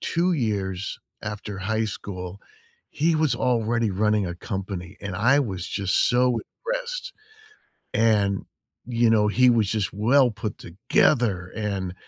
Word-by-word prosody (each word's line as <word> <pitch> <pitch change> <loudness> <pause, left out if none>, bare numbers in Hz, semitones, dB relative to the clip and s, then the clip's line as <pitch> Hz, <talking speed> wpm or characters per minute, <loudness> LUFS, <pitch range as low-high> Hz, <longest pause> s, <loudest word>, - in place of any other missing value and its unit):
2 175 +2 +1
years 100 - -2 0.2
after 105 -1 -5
high 110 +3 0
school, 95 -2 -6 0.5
he 165 +3 +1
was 155 -5 +2
already 115 -2 +1
running 105 +1 +1
a 85 - -4
company, 95 -1 -5
and 100 -2 -5
I 125 +9 +4
was 95 -9 -3
just 100 -2 -1
so 125 -1 +2 0.3
impressed, - - -3 0.8
and, 105 -3 +2 0.4
you 120 -1 +2
know, 105 -2 +4
he 125 +4 +4
was 110 -4 +2
just 105 -2 -1
well 120 +5 +4
put 105 0 -5
together 100 - +1
and, 100 -4 -3
105 Hz, 135 wpm, -24 LUFS, 95-120 Hz, 0.8 s, I